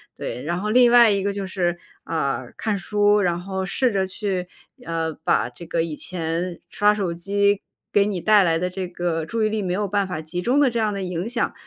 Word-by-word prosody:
对， 125 - -5
然 175 +3 -2
后 210 - -2
另 245 +1 +5
外 235 -3 +7
一 200 -1 0
个 200 0 0
就 200 -1 -4
是， 175 -2 -1 0.3
呃， 135 -6 -2
看 215 -3 -1
书， 205 +2 +2
然 175 -2 +1
后 190 +1 -4
试 245 +6 +1
着 190 -1 +1
去， 185 -2 -3 0.4
呃， 165 -1 -2
把 - - +2
这 125 +8 -11
个 165 0 0
以 165 -2 -4
前 170 +1 -3
刷 210 0 +3
手 190 -5 -2
机 200 +3 +1 0.3
给 200 -1 +5
你 200 -4 -2
带 210 -2 +5
来 165 -2 +2
的 180 0 -1
这 185 0 -4
个 170 -2 -2
注 225 +5 -1
意 - - +2
力 215 -1 -1
没 180 -2 -1
有 205 +1 -1
办 200 0 +1
法 160 -4 -4
集 170 +3 -4
中 255 +8 +2
的 280 -3 +5
这 235 -1 -2
样 215 -2 +1
的 195 - -4
影 180 +2 -3
响， 240 -2 -1
190 Hz, 245 characters per minute, -23 LUFS, 170-210 Hz, 0.4 s, 外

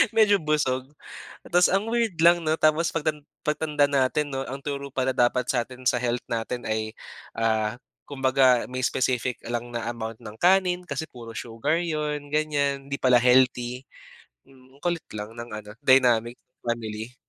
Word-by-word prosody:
Medyo 210 -2 +5
busog. 150 -5 0 0.6
Tas 175 +1 +5
ang 195 +4 +1
weird 230 -5 +1
lang 170 +1 +7
'no, 155 0 +2
tapos 155 +1 +2
pagtan 150 -2 -2 0.2
pagtanda 150 -1 +1
natin 140 +2 +1
'no, 135 0 -3
ang 135 +1 -6
turo 140 -1 -4
pala 130 0 +1
dapat 125 +1 +2
sa 120 -3 0
atin, 130 0 -12
sa 125 -2 +3
health 120 0 -1
natin 115 +2 -3
ay, 110 0 -2 0.4
ah, 110 -1 0 0.3
kumbaga 130 -3 +3
may 130 - -3
specific 125 -1 0
lang 120 0 -4
na 115 -1 -3
amount 115 -1 -6
ng 105 +1 -10
kanin 180 0 +3
kasi 140 -1 -3
puro 115 -2 -10
sugar 120 +10 -1
'yon, 150 -3 -3
ganyan. 145 -2 0
'Di 140 - -2
pala 125 -2 +5
healthy. 125 0 +3 0.6
Hmm, 130 0 -21
ang - - -33
kulit 175 -2 -1
lang 105 +1 -6
ng 115 0 -6
ano, 105 -1 -8
dynamic 120 -3 +4 0.3
family. 115 0 -4
130 Hz, 165 wpm, -25 LUFS, 120-150 Hz, 0.6 s, lang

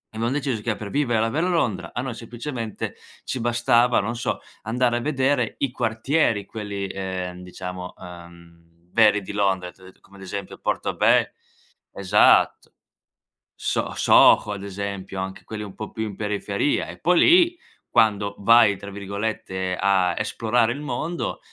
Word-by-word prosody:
abbiam 115 +2 -1
deciso 135 -6 -1
che 110 -1 -1
per 105 -2 -7
vivere 125 -6 +1
la 115 - +2
vero 165 +8 0
Londra 125 - -1
a 120 - -3
noi 130 -2 -4
semplicemente 120 -1 -6 0.3
ci 130 - -3
bastava, 120 +1 +3
non 115 +4 -3
so, 120 - -2 0.2
andare 120 +2 +1
a - - -3
vedere 135 -4 0
i 135 -3 0
quartieri 115 -1 0
quelli, 100 -2 -5
ehm, 95 -2 -5
diciamo, 90 0 -7
uhm, 85 -1 -14
veri 105 -2 +5
di 100 - -8
Londra, 95 -3 0
ti 95 - -25
ho - - -14
det - - -31
come 100 - -20
ad 95 - -11
esempio 100 0 -6
Portobe - - +1 0.6
esatto, 95 -2 +3 0.8
So - - -2
Soho 105 - +5
ad 100 -1 -7
esempio, 100 -1 -5
anche 95 0 -6
quelli 105 -1 -6
un 100 -2 -9
po' 110 - -7
più 110 - -4
in 100 -3 -6
periferia. 105 +4 -1
E - - -10
poi 180 0 +3
lì, 345 0 +5 0.3
quando 105 -3 +2
vai, 115 0 +6
tra 100 +1 -9
virgolette, 100 -2 -3
a 95 -3 +2
"esplorare 115 +2 +1
il 145 - -7
mondo", 165 +3 -3
105 Hz, 160 wpm, -23 LUFS, 95-120 Hz, 0.8 s, vai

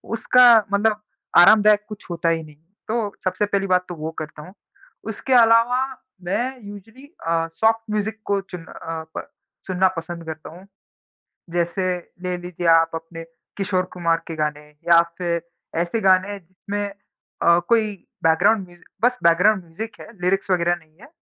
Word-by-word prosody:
उसका 250 +2 +5 0.3
मतलब 210 +1 +2 0.4
आरामदायक 210 +3 +6
कुछ 210 - -9
होता 170 -1 0
ही 165 -1 0
नहीं। 150 -1 -14 0.3
तो 220 -2 -1
सबसे 190 +2 0
पहली 200 -1 -1
बात 180 0 +2
तो 175 - -5
वो 155 +1 -5
करता 155 -1 -7
हूँ। 180 +5 -12 0.6
उसके 255 +4 -2
अलावा 230 +1 +5 0.4
मैं 245 +8 -2
यूज़्अली 205 +6 -12 0.2
अ, 165 0 +1
सॉफ़्ट 225 0 +2
म्यूज़िक 215 +1 -2
को 200 -1 +1
चुन 180 -3 -9
अ, 165 -1 -7
प - - -5 0.4
सुनना 185 0 +3
पसंद 170 0 -6
करता 160 -1 -7
हूँ। 180 +4 -13 0.9
जैसे 175 +2 -1 0.3
ले 180 0 -2
लीजिए 175 -1 -5
आप 165 0 +5
अपने 165 0 -7 0.3
किशोर 190 -2 0
कुमार 170 -2 +1
के 165 - -6
गाने, 150 -1 -3 0.2
या 170 0 +8 0.2
फिर 170 -1 -1 0.4
ऐसे 175 +6 -1
गाने 190 +1 +3
जिसमें 200 +3 -5 0.6
अ, 170 0 +5
कोई 220 -3 +2 0.3
बैकग्राउंड 185 +5 +3
म्यूज़िक 175 0 -20 0.2
बस 250 0 +3
बैकग्राउंड 180 +3 +4
म्यूज़िक 215 +8 -7
है, - - -10
लिरिक्स 195 +2 0
वग़ैरह 175 -1 +2
नहीं 160 -2 -21
है, 240 - -14
185 Hz, 160 wpm, -22 LUFS, 170-210 Hz, 0.9 s, या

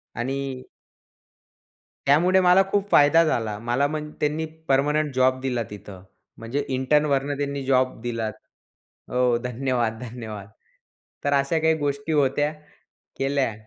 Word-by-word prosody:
आणि 130 +1 -4 1.4
त्यामुळे 175 +7 +4
मला 180 +2 +7
खूप 205 0 0
फायदा 150 +3 +6
झाला, 110 -8 -1
मला 135 +4 +2
मग 150 0 -4
त्यांनी 150 +2 0 0.2
परमनंट 145 +2 +2
जॉब 130 0 +2
दिला 125 -3 -1
तिथं. 100 -2 -10 0.4
म्हणजे 130 +6 -3
इंटर्नवरनं 140 +1 +1
त्यांनी 140 -1 -3
जॉब 130 -3 +1
दिला. 115 -2 -2 0.8
हो 125 -1 +2
धन्यवाद, 120 -3 -1
धन्यवाद. 110 -4 -7 0.8
तर 145 - +1
अशा 140 +4 +2
काही 160 0 +3
गोष्टी 145 +2 -2
होत्या, 145 +1 +2 0.7
केल्या. 135 -3 0
135 Hz, 120 wpm, -24 LUFS, 125-150 Hz, 1.4 s, मला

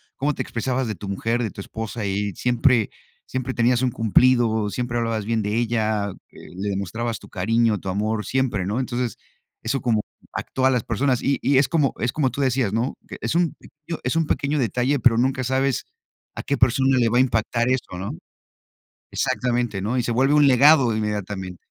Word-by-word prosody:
como 145 +1 -1
te 130 - -2
expresabas 125 +1 -2
de 110 - -2
tu 100 +2 -8
mujer, 115 +5 -1
de 115 - -1
tu - - -12
esposa 110 +1 -5
y 100 +1 -1
siempre, 120 -2 +2 0.3
siempre 130 0 -4
tenías 120 +1 +2
un 130 - +2
cumplido, 115 -1 +3
siempre 120 +1 -2
hablabas 115 -3 -1
bien 115 0 0
de 105 +1 -2
ella, 110 -3 0 0.2
eh, - - -14
le 100 +2 -3
demostrabas 110 +4 -3
tu - - -15
cariño, 110 +2 +1
tu 95 - -5
amor 105 +3 -1
siempre", 130 -7 0
¿no?, 110 +5 -1
entonces 125 -3 -2 0.5
eso 125 +4 -1
como 115 -3 +1 0.3
actúa 130 0 0
las 125 -4 +1
personas 125 +2 0
y 140 0 +1
y 135 -1 +3
es 135 - +4
como 150 -6 +1
es 120 - -1
como 140 -4 +1
tú 135 +4 -4
decías, 130 -6 +1
¿no?, 120 +4 0
que - - -8
es - - -1
un 170 -1 +1
pequeño 155 +3 -9
es 125 - -1
un 165 -1 +1
pequeño 145 0 0
detalle, 125 +4 +1
pero 115 -1 +4
nunca 130 +1 +1
sabes 130 +1 0 0.5
a - - -5
qué 140 - -1
persona 130 +1 +3
le 115 -1 +3
va 120 - +1
a - - +6
impactar 120 0 +1
eso, 125 -8 -2
¿no? 95 +2 -4 1.0
Exactamente, 120 -5 -1
¿no?, 115 +6 -1
y 125 - +1
se 120 - -1
vuelve 135 +5 +3
un 145 -1 +5
legado 135 -2 +6
inmediatamente. 105 -4 -4
120 Hz, 200 wpm, -23 LUFS, 110-130 Hz, 1.0 s, a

